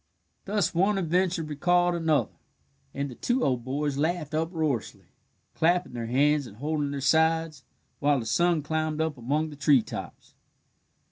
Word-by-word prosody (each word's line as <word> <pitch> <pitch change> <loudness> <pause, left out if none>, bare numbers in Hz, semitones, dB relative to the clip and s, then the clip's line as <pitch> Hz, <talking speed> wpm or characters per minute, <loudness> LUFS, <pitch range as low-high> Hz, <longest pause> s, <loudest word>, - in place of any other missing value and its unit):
Thus 205 +1 0
one 195 +4 +2
adventure 180 -1 0
recalled 175 +4 +1
another, 160 -3 +1 0.6
and 140 +1 -3
the 130 - -8
two 245 - -1
old 125 -3 0
boys 140 +2 -2
laughed 160 -1 -1
uproariously, 155 - -2 0.5
clapping 175 -2 +1
their 115 -2 -4
hands 145 +3 +2
and 105 - -14
holding 150 +2 -2
their 140 -1 -4
sides, 160 0 +2 0.4
while 145 -1 +2
the 115 - -5
sun 160 +7 +2
climbed 155 0 -2
up 160 -2 0
among 145 +6 -1
the - - -9
treetops. 140 -4 0
155 Hz, 145 wpm, -27 LUFS, 140-170 Hz, 0.6 s, one